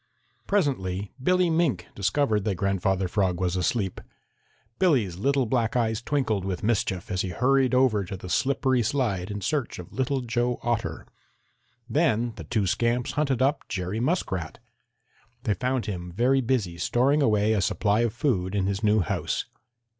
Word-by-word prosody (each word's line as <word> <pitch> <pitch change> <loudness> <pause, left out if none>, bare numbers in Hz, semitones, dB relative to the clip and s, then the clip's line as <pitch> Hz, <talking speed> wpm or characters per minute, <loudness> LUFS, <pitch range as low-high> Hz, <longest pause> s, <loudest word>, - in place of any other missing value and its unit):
Presently 105 - 0
Billy 180 +3 +3
Mink 150 - 0
discovered 105 +2 +1
that 105 -3 0
Grandfather 95 0 0
Frog 90 -2 0
was 90 -1 0
asleep. 95 +1 -1 0.8
Billy's 120 - +2
little 135 +5 +1
black 115 -1 0
eyes 110 -2 +1
twinkled 120 -8 0
with 95 -2 -3
mischief 100 -4 -1
as 95 -1 0
he 95 - -3
hurried 130 +6 +2
over 125 -6 +3
to 95 +2 -6
the 90 - -9
slippery 130 +4 +1
slide 105 -7 -1
in 105 0 -4
search 145 +2 -1
of 90 - -10
Little 130 +1 0
Joe 120 0 -1
Otter. 120 -2 -2 0.8
Then 120 -4 +1
the - - -8
two 105 -3 0
scamps 120 +5 0
hunted 140 -4 +1
up 140 +2 0
Jerry 95 +2 -3
Muskrat. 115 - -1 0.9
They 110 -6 +1
found 130 +2 -1
him 90 -4 -5
very 125 +8 +2
busy 110 -9 -1
storing 135 - +2
away 110 -3 +3
a 105 - +1
supply 100 +2 +1
of 120 -1 +2
food 105 - -1
in 100 -2 +1
his 100 +2 -2
new 105 0 +4
house. 85 - -2
110 Hz, 160 wpm, -26 LUFS, 95-130 Hz, 0.9 s, new